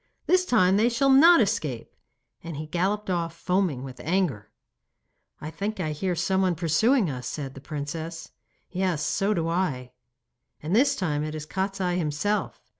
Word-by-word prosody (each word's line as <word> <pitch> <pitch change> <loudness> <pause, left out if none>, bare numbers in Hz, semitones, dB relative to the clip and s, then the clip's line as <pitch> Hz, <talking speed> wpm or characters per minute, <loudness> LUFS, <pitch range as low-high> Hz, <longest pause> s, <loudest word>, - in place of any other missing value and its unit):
This 365 0 +3
time 195 - +3
they 225 +3 +3
shall 270 +3 +2
not 330 +4 +7
escape.' 145 - -2 0.5
And 165 -3 -6
he 155 - -5
galloped 190 +6 -1
off, 170 -2 -2
foaming 180 -7 -1
with 130 -1 -9
anger. 160 - -1 0.9
'I 155 - -6
think 205 +5 -4
I 155 - -1
hear 180 +4 -2
someone 185 +1 +1
pursuing 185 - +2
us,' 125 -4 -5
said 140 -3 -5
the 135 - -11
princess 160 +3 -6 0.4
'Yes, 180 -5 -1
so 195 +7 0
do 165 -2 -1
I.' 155 -8 -2 0.7
'And 165 +6 0
this 265 +5 +4
time 150 -6 -1
it 155 0 -4
is 155 -1 -6
Kostiei 190 0 -2
himself. 165 +7 -2
175 Hz, 160 wpm, -26 LUFS, 150-195 Hz, 0.9 s, not